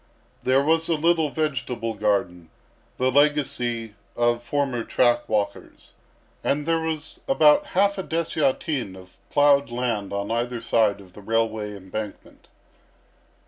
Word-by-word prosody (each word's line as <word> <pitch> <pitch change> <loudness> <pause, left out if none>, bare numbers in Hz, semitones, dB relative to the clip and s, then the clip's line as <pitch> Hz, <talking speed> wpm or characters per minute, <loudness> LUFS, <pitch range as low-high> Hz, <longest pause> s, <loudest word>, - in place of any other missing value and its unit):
There 130 +2 +3
was 165 +2 +2
a 165 - +3
little 160 0 +2
vegetable 125 -7 -2
garden, 90 -5 -1 0.5
the 130 +1 +1
legacy 125 -6 +1 0.2
of 120 0 +1
former 130 -2 -1
track 120 0 +2
walkers, 100 -2 -3 0.5
and 145 +1 0
there 165 0 +1
was 160 -1 -4
about 295 +2 +5
half 200 0 +3
a - - -2
dessiatin 150 - -1
of 95 -1 -15
ploughed 145 -1 +4
land 120 -5 -2
on 100 +1 -3
either 120 +1 -1
side 105 -3 +1
of 90 -2 -17
the 105 - -12
railway 110 -1 -1
embankment. 100 +2 -8
125 Hz, 130 wpm, -24 LUFS, 110-150 Hz, 0.5 s, about